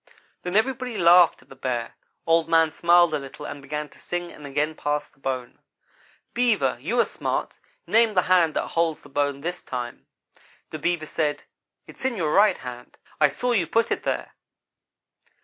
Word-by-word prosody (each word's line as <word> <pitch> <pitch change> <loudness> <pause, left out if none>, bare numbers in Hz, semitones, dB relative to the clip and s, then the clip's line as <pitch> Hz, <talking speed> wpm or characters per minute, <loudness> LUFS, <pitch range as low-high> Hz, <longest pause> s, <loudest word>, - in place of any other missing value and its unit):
Then 180 +1 -4
everybody 250 +1 0
laughed 170 -3 +6
at 130 - -30
the 135 - -12
Bear. 125 -3 -3 0.3
Old 165 0 +3
man 165 -1 +4
smiled 175 +1 +4
a 150 - +1
little 140 +2 -9
and 145 - -7
began 150 +2 -4
to - - -19
sing 175 0 -4
and 150 -1 -10
again 145 +3 -1
pass 150 -1 -2
the - - -31
bone. 130 -2 -4 0.7
"'Beaver, 215 - +2
you 215 - -1
are 235 - +5
smart; - - -3 0.3
name 225 -1 +3
the 180 - +4
hand 175 -4 +3
that - - -1
holds 165 -2 0
the - - -14
bone 145 0 -1
this 175 +3 -4
time.' 120 -2 -6 0.6
"The 155 - -5
Beaver 170 0 -1
said: 150 -1 -2 0.4
'It's - - -13
in 260 -3 -1
your 160 -5 0
right 205 -2 +5
hand. 125 -1 -9 0.2
I 150 - +6
saw 245 - -2
you 190 -9 +2
put 230 +6 +1
it - - 0
there.' - - -3
160 Hz, 185 wpm, -24 LUFS, 145-180 Hz, 0.7 s, laughed